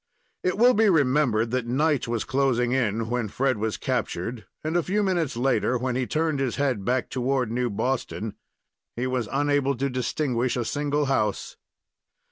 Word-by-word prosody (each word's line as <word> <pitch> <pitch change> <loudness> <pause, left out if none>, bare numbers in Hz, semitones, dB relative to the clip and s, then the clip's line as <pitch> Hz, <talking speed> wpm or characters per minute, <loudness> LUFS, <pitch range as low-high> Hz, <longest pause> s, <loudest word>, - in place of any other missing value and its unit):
It 185 +1 0
will 245 +3 +6
be 220 -1 +4
remembered 130 - +2
that 125 -2 -1
night 145 +2 +1
was 115 -1 -1
closing 130 -3 +1
in 115 -3 0
when 120 -1 -1
Fred 130 +2 0
was 110 0 -1
captured 105 +3 -3 0.2
and 155 +2 -2
a 175 - +4
few 205 +5 0
minutes 170 -10 0
later, 130 0 +1
when 125 0 -2
he 130 -1 -1
turned 155 -2 0
his 135 -3 -1
head 130 -7 0
back 125 +4 0
toward 130 -2 -1
New 125 +1 0
Boston, 110 -1 -2 0.6
he 120 - -2
was 125 -4 -1
unable 140 -1 +1
to 140 +2 -1
distinguish 125 -1 -1
a 120 - -1
single 145 +3 0
house. 105 -7 -1
130 Hz, 170 wpm, -25 LUFS, 120-145 Hz, 0.6 s, will